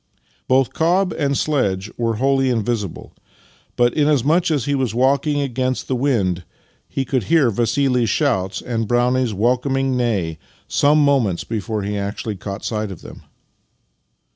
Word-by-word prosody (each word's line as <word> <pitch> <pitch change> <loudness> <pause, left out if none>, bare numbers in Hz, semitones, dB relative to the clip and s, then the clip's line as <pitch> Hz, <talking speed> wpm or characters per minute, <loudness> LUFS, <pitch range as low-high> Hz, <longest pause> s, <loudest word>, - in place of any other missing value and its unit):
Both 130 0 +2
cob 180 +4 +1
and 140 -3 0
sledge 105 -9 0
were 115 -1 -1
wholly 135 +2 +2
invisible, 110 -5 -2 0.6
but 120 0 +3
inasmuch 150 +4 +2
as 145 -6 0
he 145 - 0
was 130 -5 -1
walking 140 +3 +2
against 130 -1 -2
the 130 - 0
wind, 105 -10 0 0.5
he 135 - -2
could 130 -4 -1
hear 155 -7 +3
Vassili's 120 +2 +1
shouts 105 -12 0
and 115 -3 -2
Brownie's 120 0 +1
welcom 125 +6 +1
ing 135 -1 0
neigh 100 -10 -1 0.3
some 150 +1 +3
moments 120 -11 +1
before 110 -1 -3
he 100 +1 -2
actually 100 +2 -4
caught 100 +2 -7
sight 110 -2 -2
of 95 - -10
them. - - -11
125 Hz, 145 wpm, -20 LUFS, 110-140 Hz, 0.6 s, but